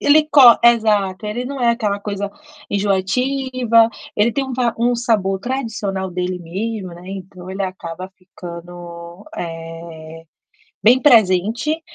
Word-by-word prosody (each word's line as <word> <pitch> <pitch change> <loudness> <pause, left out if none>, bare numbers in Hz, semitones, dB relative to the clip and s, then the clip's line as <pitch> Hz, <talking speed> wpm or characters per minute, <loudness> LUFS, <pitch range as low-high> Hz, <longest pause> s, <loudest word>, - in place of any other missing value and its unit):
ele 305 +1 +4
co 250 -5 +8
exato, 215 -4 +3
ele 215 +4 -3
não 275 0 -5
é 240 -1 +4
aquela 215 -4 -1
coisa 200 -1 -4 0.4
enjoativa, 230 +4 +2 0.3
ele 210 +3 +3
tem 275 +2 -1
um 265 - -6
va 240 -2 0
um 240 +1 +2
sabor 210 -6 0
tradicional 210 -6 -3
dele 180 0 -3
mesmo, 195 +4 -4
né, 175 +2 -12
então 190 -1 -9
ele 195 +1 -3
acaba 185 -1 -6
ficando, 175 0 -10
eh, 165 -1 -8 0.6
bem 250 +4 +6
presente 230 - +3
200 Hz, 130 wpm, -19 LUFS, 180-235 Hz, 0.6 s, co